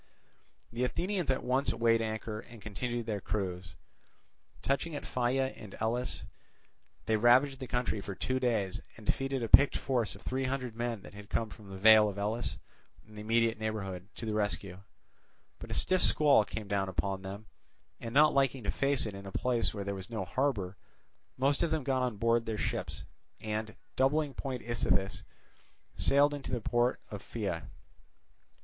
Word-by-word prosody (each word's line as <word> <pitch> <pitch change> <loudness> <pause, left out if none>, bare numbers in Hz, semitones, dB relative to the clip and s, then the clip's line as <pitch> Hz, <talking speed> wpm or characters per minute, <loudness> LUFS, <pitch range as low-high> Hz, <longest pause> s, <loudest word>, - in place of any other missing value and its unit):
The 120 +2 -1
Athenians 180 +7 -1
at 130 - +1
once 130 +3 +2
weighed 115 0 +3
anchor 110 -1 -3
and 115 +1 -12
continued 120 +3 -3
their 105 -3 -2
cruise. 95 -3 -3 0.9
Touching 140 +4 0
at - - -5
Pheia 130 +2 0
in 105 -4 -10
Elis, 120 +3 -1 0.8
they 110 -1 +2
ravaged 130 +5 +5
the 130 - -5
country 120 -4 -1
for 100 -1 -6
two 130 +6 -1
days 110 -7 0 0.2
and 110 - -12
defeated 135 +1 0
a - - -1
picked 140 +6 +7
force 120 -8 -1
of 100 - -14
three 135 +1 -1
hundred 130 -3 -2
men 120 -3 -3
that - - -12
had 105 0 -11
come 110 -2 -1
from 105 -2 -12
the 95 - -7
vale 110 +1 +7
of 100 - -7
Elis 110 +4 -2 0.5
and 110 0 -16
the 105 - -7
immediate 115 0 +2
neighbourhood 95 -4 -4
to 115 - -6
the 110 - -2
rescue. 100 -3 -1 0.8
But - - -9
a - - -3
stiff 185 0 +2
squall 145 -8 +5
came 105 0 -6
down 100 -1 0
upon 95 +2 -2
them, 100 +3 -7 0.5
and, 115 - -6
not 150 +4 +6
liking 135 -2 +2
to - - 0
face 140 -2 +2
it 105 - -4
in 100 0 -8
a - - -7
place 120 +2 +2
where 100 -2 -4
there 100 0 -3
was 95 +1 -7
no 110 -5 -3
harbour, 105 -4 -1 0.6
most 140 +2 +2
of 170 - +2
them 155 -2 0
got 130 -1 +1
on 125 -4 -1
board 115 +1 +2
their 110 -1 -2
ships, - - -3 0.4
and 110 0 -3 0.2
doubling 140 +2 +2
Point 130 -3 -4
Ichthys 95 -5 0 0.7
sailed 145 +1 +4
into 145 -1 -5
the 120 - 0
port 120 +2 +1
of 105 -2 -6
Pheia. 100 -8 -4
115 Hz, 180 wpm, -31 LUFS, 105-130 Hz, 0.9 s, picked